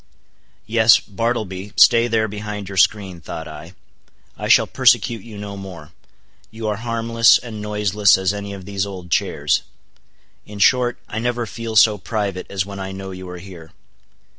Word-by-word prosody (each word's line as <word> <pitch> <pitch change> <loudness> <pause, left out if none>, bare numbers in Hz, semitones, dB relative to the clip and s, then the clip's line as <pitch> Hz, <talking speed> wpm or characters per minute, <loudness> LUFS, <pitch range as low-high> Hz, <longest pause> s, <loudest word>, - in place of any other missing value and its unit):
Yes, 110 0 +5
Bartleby, 105 -2 -4
stay 115 +6 +6
there 110 -2 +1
behind 105 -1 -6
your 100 - -7
screen, 95 -3 +1
thought 80 0 -7
I; 80 +4 -11 0.6
I - - -5
shall - - +5
persecute 115 -3 +2
you 110 0 -11
no 100 0 -7
more; 90 -5 -10 0.6
you 110 +1 -6
are 105 - -2
harmless 115 0 +3
and 110 -4 -8
noiseless 105 -1 +2
as 95 0 0
any 100 0 -6
of 95 -2 -9
these 100 0 -2
old 90 -3 -9
chairs; 75 -3 +1 0.8
in 105 - -11
short, 120 +4 +3
I 110 - -4
never 120 0 -1
feel 115 0 -6
so 105 -1 +5
private 100 -2 -3
as 95 -2 -2
when 100 -1 -8
I 95 0 -5
know 95 0 -7
you 95 -1 -9
are 90 - -7
here. 85 -4 -12
100 Hz, 165 wpm, -20 LUFS, 95-110 Hz, 0.8 s, stay